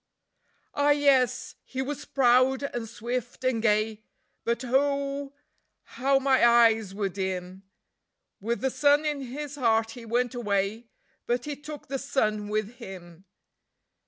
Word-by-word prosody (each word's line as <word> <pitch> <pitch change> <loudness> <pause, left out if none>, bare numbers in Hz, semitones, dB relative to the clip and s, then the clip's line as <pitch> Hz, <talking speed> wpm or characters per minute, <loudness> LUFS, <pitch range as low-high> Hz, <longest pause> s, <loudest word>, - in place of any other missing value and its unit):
Ah 285 0 +2
yes, 270 -3 +3
he 260 - -7
was 275 +2 -3
proud 255 +1 +3
and 240 -5 -4
swift 240 +2 -5
and 255 -3 +1
gay, 215 0 +1 0.4
but 235 +2 -1
oh 280 +2 0 0.5
how 270 +3 +1
my 270 -2 +3
eyes 230 -3 +5
were 200 0 -2
dim! 190 -1 -4 0.8
With 230 +4 -2
the 265 0 0
sun 290 +2 +3
in 295 -2 -1
his 285 +3 -6
heart 225 -3 +2
he 240 +1 -10
went 245 +2 0
away, 210 -1 -1 0.4
but 240 0 0
he 295 -1 -4
took 295 +1 -9
the 270 0 -3
sun 215 -6 -1
with 215 +3 -2
him. 185 -5 -11
245 Hz, 135 wpm, -27 LUFS, 215-275 Hz, 0.8 s, eyes